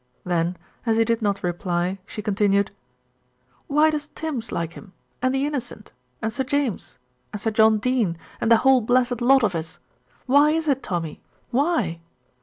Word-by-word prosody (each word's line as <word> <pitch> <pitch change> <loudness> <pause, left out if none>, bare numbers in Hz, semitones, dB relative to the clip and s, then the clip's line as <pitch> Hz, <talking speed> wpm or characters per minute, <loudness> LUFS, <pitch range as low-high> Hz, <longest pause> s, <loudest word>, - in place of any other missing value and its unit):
Then 175 0 0 0.3
as 225 -2 +1
he 225 - +4
did 230 0 0
not 200 -2 -1
reply 175 +1 -1
she 210 - -7
continued: 200 -1 +2 1.0
"Why 300 +2 +4
does 300 -1 -3
Tims 290 -8 -4
like 170 0 -3
him, 195 -3 -13 0.3
and 255 +1 +2
the 270 +1 0
Innocent, 245 -7 -5 0.3
and 220 0 -1
Sir 265 - -1
James, 280 -5 -2 0.3
and 210 - -5
Sir 220 +2 -1
John 220 0 +5
Dene, 220 -7 0 0.2
and 230 - +1
the 230 - +8
whole 265 +1 +4
blessed 245 +1 +1
lot 265 +1 +5
of 205 -4 +2
us? 160 -1 -5 0.5
Why 285 +3 +5
is 320 +1 0
it, 270 -2 +2
Tommy, 170 -7 -4 0.3
why?" 245 - +1
225 Hz, 170 wpm, -23 LUFS, 195-265 Hz, 1.0 s, the